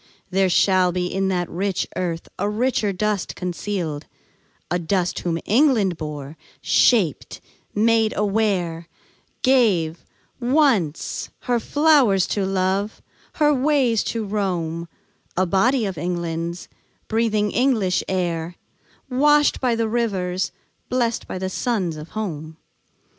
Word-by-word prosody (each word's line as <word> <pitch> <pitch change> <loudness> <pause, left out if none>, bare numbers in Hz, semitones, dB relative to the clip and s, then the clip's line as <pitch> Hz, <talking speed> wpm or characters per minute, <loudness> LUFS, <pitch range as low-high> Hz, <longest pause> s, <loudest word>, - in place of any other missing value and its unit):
There 190 0 +2
shall 185 0 +3
be 180 0 -1
In 195 0 0
that 180 -2 0
rich 190 +2 -2
earth 170 -2 -3
a 205 +2 0
richer 220 -1 0
dust 205 0 -2
concealed; 175 -4 -4 0.6
A 175 - +1
dust 180 +1 -1
whom 170 -2 -1
England 220 - +3
bore, 150 -1 -7 0.2
shaped, 195 - +2 0.4
made 220 +1 +3
aware, 195 -6 0 0.6
Gave, 200 -12 +2 0.4
once, 245 - +1
her 245 -2 0
flowers 275 - +3
to 200 -2 0
love, 195 +2 -1 0.3
her 295 -1 +3
ways 265 -5 +2
to 225 -2 -2
roam, 175 -5 -2 0.5
A 185 - +3
body 225 +7 +2
of 190 -6 -4
England's, 170 0 -3 0.4
breathing 215 -2 +1
English 225 -7 +1
air, 175 -2 -2 0.5
Washed 295 +3 +3
by 250 -3 +2
the 230 -1 0
rivers, 195 -6 -1 0.4
blest 240 -2 0
by - - -5
suns 190 -3 -1
of 155 +1 -9
home. 160 -6 -5
195 Hz, 115 wpm, -22 LUFS, 175-230 Hz, 0.6 s, shall